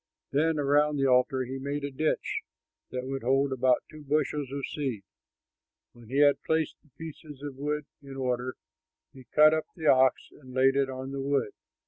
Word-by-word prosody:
Then 155 +3 +2
around 145 +1 +3
the 135 - +2
altar 130 0 +3
he 135 +2 -5
made 140 +1 -3
a 140 - -3
ditch 155 +4 -1 0.5
that 125 0 -4
would 135 0 -3
hold 135 +2 +2
about 130 -1 +2
two 155 -1 -11
bushels 145 -1 -1
of 140 0 -3
seed. 130 -9 -3 0.9
When 120 -2 -16
he 135 - -2
had 145 -1 +5
placed 160 -1 0
the 150 - -28
pieces 155 -3 -9
of 145 -2 -5
wood 150 +1 -2 0.2
in 135 -1 -10
order, 125 -1 -2 0.6
he 130 -2 -14
cut 155 +3 +6
up 155 0 -1
the 160 - -7
ox 130 -3 +4
and 130 -3 -14
laid 135 +1 +4
it 140 -1 +2
on 130 +1 -6
the 135 0 -3
wood. 140 -5 0
140 Hz, 185 wpm, -28 LUFS, 130-150 Hz, 0.9 s, cut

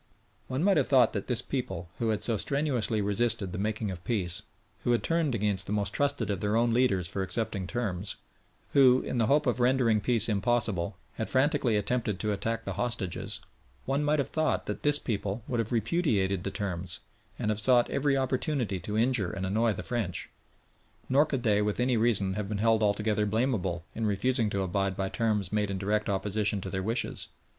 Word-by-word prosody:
One 130 +4 -1
might 195 -2 +4
have 140 - +2
thought 130 -2 +5
that 100 - -3
this 125 -2 -1
people, 95 -10 -4
who 115 - 0
had 110 - 0
so 115 - +1
strenuously 125 -4 0
resisted 105 -1 +1
the 90 - -4
making 105 0 -1
of 90 -2 -8
peace, 100 -5 0 0.4
who 120 - +2
had 120 - +1
turned 165 -6 +1
against 100 -3 0
the 105 - -2
most 100 -2 -1
trusted 145 -5 0
of 100 - -2
their 105 +1 0
own 115 0 +3
leaders 115 -8 +2
for 95 - -3
accepting 95 -1 -2
terms, 100 -5 -3 0.6
who, 130 -2 +6
in 125 - -2
the 115 - +3
hope 145 +5 +3
of 125 -1 +1
rendering 120 -3 +3
peace 115 -1 +2
impossible, 105 -4 0 0.2
had 110 - -3
frantically 130 -4 +2
attempted 105 -2 -1
to 105 - -1
attack 115 +3 -2
the - - -3
hostages 115 -7 -3 0.4
one 135 +2 0
might 150 +1 +2
have 140 - -1
thought 155 0 0
that - - -4
this 145 0 +3
people 105 -3 -3
would 120 - -1
have 115 0 -2
repudiated 110 - +1
the - - -2
terms, 95 -3 -4 0.4
and 105 - 0
have 105 - -2
sought 120 +1 +4
every 140 0 +2
opportunity 130 -5 -1
to 105 +3 -4
injure 115 -5 +2
and 95 0 -4
annoy 110 +4 +2
the - - -5
French. 115 -8 -3 0.8
Nor 140 +4 +4
could 135 -4 -2
they 105 -3 +3
with 105 +1 -1
any 125 0 +2
reason 110 -4 +2
have 100 0 -3
been 105 - -2
held 110 +1 +3
altogether 105 0 +1
blamable 100 -7 0
in 110 -1 -1
refusing 110 +3 +1
to 100 -1 -1
abide 95 +1 -1
by 95 0 -1
terms 105 -5 0
made 105 -1 +1
in 100 - -2
direct 105 +2 0
opposition 100 +1 0
to 95 - -6
their 95 - -2
wishes. 115 +5 -2
110 Hz, 200 wpm, -29 LUFS, 100-125 Hz, 0.8 s, who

